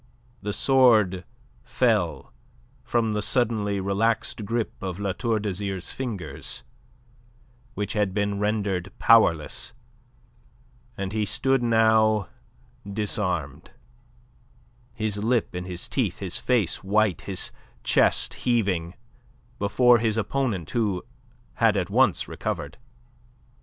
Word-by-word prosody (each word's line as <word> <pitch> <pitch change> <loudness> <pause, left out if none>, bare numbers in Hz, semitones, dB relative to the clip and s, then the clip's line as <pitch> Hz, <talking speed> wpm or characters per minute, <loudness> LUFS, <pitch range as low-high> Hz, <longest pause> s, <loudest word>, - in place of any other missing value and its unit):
The 105 - -3
sword 110 -8 +4 0.4
fell - - 0 0.5
from 115 -2 0
the 105 - -1
suddenly 105 -4 +1
relaxed 105 +3 0
grip 115 +2 -2
of 95 -2 -4
La 100 -1 -1
Tour 115 +3 0
d'Azyr's 100 -2 -3
fingers, 95 - -5 1.1
which 100 -1 -3
had 105 -3 +1
been 100 0 -1
rendered 100 -3 -1
powerless, 85 -10 +3 1.2
and 100 -1 -4
he 110 -1 0
stood 135 +5 +1
now 110 -3 +3 0.6
disarmed, 90 -8 -2 1.3
his 110 -2 -2
lip 120 0 +1
in 90 0 -4
his 90 -1 -5
teeth, - - -1
his - - -3
face 115 -11 0
white, 105 -1 +2
his 95 -2 -3 0.3
chest - - +2
heaving, 95 -8 0 0.6
before 120 +4 +4
his 110 -1 0
opponent, 110 - -1
who 105 -6 0 0.5
had - - +3
at - - -2
once - - +3
recovered. 75 +9 -5
105 Hz, 105 wpm, -25 LUFS, 95-115 Hz, 1.3 s, sword